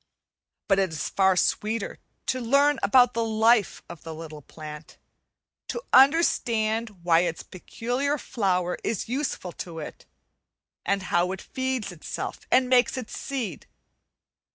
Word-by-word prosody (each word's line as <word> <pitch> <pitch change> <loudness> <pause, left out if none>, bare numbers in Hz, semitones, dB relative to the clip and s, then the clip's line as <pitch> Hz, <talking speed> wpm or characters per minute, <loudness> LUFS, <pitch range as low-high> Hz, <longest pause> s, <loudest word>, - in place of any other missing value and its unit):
But 195 -1 +3
it 190 -1 +2
is 160 -1 -4
far 190 -1 +3
sweeter 215 +3 -1 0.3
to 255 - -1
learn 280 +4 +3
about 245 +4 +5
the 230 - 0
life 220 -1 +2
of 170 -2 -10
the 160 -1 -8
little 155 -2 -9
plant, 150 +1 -10 0.7
to - - -3
understand 230 - +3
why 165 -1 +4
its 170 -2 -1
peculiar 245 +9 -3
flower 180 -8 -1
is 220 - -2
useful 250 -7 -3
to 170 -2 -8
it, 155 - -8 0.8
and 200 -1 0
how 175 +1 +3
it 190 - -7
feeds 260 -5 -3
itself, 170 -3 -6
and 255 0 +4
makes 255 +1 +3
its 250 -4 -6
seed. 240 - -5
215 Hz, 135 wpm, -26 LUFS, 180-250 Hz, 0.8 s, about